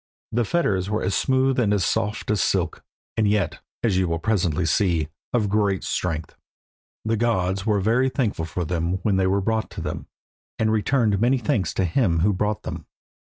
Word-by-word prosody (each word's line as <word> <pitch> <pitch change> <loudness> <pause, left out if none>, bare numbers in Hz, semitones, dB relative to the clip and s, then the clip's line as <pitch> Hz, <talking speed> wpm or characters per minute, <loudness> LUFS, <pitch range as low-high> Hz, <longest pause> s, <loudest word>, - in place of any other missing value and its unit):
The 120 +1 +1
fetters 100 - 0
were 105 +1 -1
as 95 - 0
smooth 130 +2 +2
and 110 -4 +2
as 100 -4 +2
soft 105 -1 -1
as 105 -4 +1
silk, - - 0 0.3
and 110 -2 +2
yet, 100 -4 0 0.2
as 100 -5 +2
you 95 - +1
will 85 0 0
presently 90 -3 0
see, 85 -2 +1 0.2
of 115 -4 +1
great 100 -2 +1
strength. 80 -3 -3 0.7
The 110 +1 +1
gods 100 -3 0
were 105 -2 +3
very 115 +6 +2
thankful 110 - -1
for 85 +2 -3
them 85 +1 -1
when 100 -3 +2
they 95 -1 +2
were 100 +1 +2
brought 110 +2 -1
to - - -7
them, - - -5 0.5
and 110 0 +1
returned 110 -1 +2
many 125 +3 +3
thanks 105 -5 0
to 95 - +1
him 85 -3 +1
who 100 +3 +3
brought 105 +2 -1
them. - - -6
105 Hz, 190 wpm, -23 LUFS, 90-110 Hz, 0.7 s, were